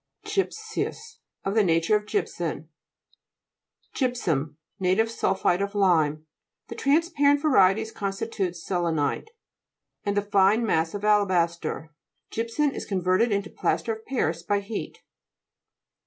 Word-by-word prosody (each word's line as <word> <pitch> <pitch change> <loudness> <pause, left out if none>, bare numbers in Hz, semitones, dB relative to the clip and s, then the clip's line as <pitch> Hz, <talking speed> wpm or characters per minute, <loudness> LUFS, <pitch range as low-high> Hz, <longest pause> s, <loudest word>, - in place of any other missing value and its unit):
GY'PSEOUS 440 +2 -3 0.3
Of 195 - 0
the 220 -1 +4
nature 165 +2 +3
of 210 0 -1
gypsum. 410 - -3 1.2
GT'PSUM - - -31
(jVp 250 -2 0
suw). 155 - 0 0.3
Native 195 +5 +2
sul 195 -4 0
phate 190 -1 +1
of 200 +1 -3
lime. 160 -6 +2 0.4
The - - -5
transparent 290 -1 +3
varieties 220 -6 +4
constitute 195 -2 -3
se/enite, 165 - -1 0.8
and 205 -1 -1
the 205 - +2
fine 205 +3 +3
massive 165 +2 0
Alabaster. 175 -6 +1 0.4
Gy'psum 230 +6 0
is - - -5
converted 185 +4 +1
into 200 0 -1
plaster 225 - -1
of 220 0 -11
Paris 170 -11 -1
by 200 +4 0
heat. 205 +2 -6
200 Hz, 125 wpm, -26 LUFS, 180-230 Hz, 1.2 s, the